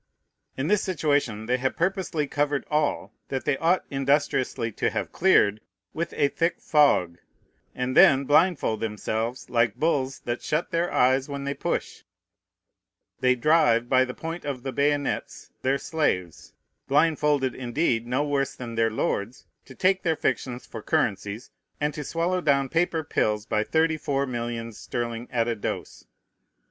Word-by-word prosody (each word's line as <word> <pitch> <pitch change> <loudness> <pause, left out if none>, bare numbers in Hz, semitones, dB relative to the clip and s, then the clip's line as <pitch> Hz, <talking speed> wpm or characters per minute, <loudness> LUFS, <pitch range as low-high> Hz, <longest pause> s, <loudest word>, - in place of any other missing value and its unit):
In 135 - -1
this 210 +2 +3
situation 145 - 0
they 125 +2 +1
have 130 +1 -1
purposely 185 -5 0
covered 145 0 -1
all, 150 -1 0
that 130 -1 -4
they 145 - +2
ought 170 +5 +2
industriously 135 -3 0
to - - 0
have - - -3
cleared, 110 - +3 0.3
with 170 +1 -3
a 140 - +3
thick 165 +4 -1
fog; 95 - +3 0.6
and 125 +1 -2
then, 145 -8 +7
blindfold 150 - +3
themselves, 110 +2 -3
like 115 -3 +1
bulls 140 -4 0
that 120 0 -3
shut 155 +3 -2
their 170 +1 0
eyes 130 +3 +2
when 140 -1 -4
they 140 0 -2
push, - - -3 1.2
they 125 0 +3
drive, 120 -4 +3
by 130 0 +5
the 125 -1 -5
point 165 +1 -6
of 135 -4 -4
the 135 - -3
bayonets, 145 +2 -1
their 135 +1 +1
slaves, 95 - -2 0.3
blindfolded 150 -2 +2
indeed 120 -2 -1
no 125 +4 0
worse 140 -2 -1
than 120 -2 -7
their 115 0 +2
lords, 110 +1 -2 0.2
to 130 - -13
take 190 +4 +2
their 165 -2 +1
fictions 125 -4 -2
for 110 - -8
currencies, 105 +3 -1 0.3
and 150 0 0
to 150 - -5
swallow 170 +5 -1
down 140 -4 +2
paper 165 -1 0
pills 105 -6 0
by 105 -1 0
thirty 160 +4 +1
four 140 -2 -1
millions 115 -3 -5
sterling 120 0 -4
at 115 -2 0
a 120 - 0
dose. 105 - -5
135 Hz, 155 wpm, -25 LUFS, 120-150 Hz, 1.2 s, then